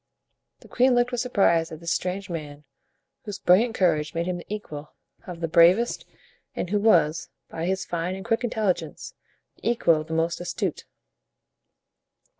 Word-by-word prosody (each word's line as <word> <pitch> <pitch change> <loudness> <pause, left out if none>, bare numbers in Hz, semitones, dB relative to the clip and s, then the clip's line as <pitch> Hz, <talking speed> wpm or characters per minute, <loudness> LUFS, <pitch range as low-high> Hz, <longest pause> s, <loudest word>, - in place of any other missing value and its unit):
The - - -16
queen 255 0 +3
looked 245 +1 +2
with 245 -1 -1
surprise 170 -9 +2
at 160 - -8
this 170 0 -4
strange 190 +2 -2
man, 150 -4 -7 0.6
whose 205 -4 -6
brilliant 225 +5 +3
courage 155 -4 +1
made 170 +1 -1
him 180 0 -2
the 175 - -11
equal 155 -8 -7 0.3
of 175 -2 -8
the 165 - 0
bravest, 175 +9 +4 0.5
and 180 - -4
who 210 - +2
was, 165 -7 +3 0.2
by 165 +1 -4
his 190 +1 -1
fine 175 +2 -3
and 190 - -8
quick 225 +2 0
intelligence, 185 -9 -2 0.4
the 225 - -2
equal 170 -9 +3
of 155 - -10
the 160 - -5
most 165 +1 0
astute. 175 - -3
180 Hz, 165 wpm, -25 LUFS, 165-210 Hz, 0.6 s, bravest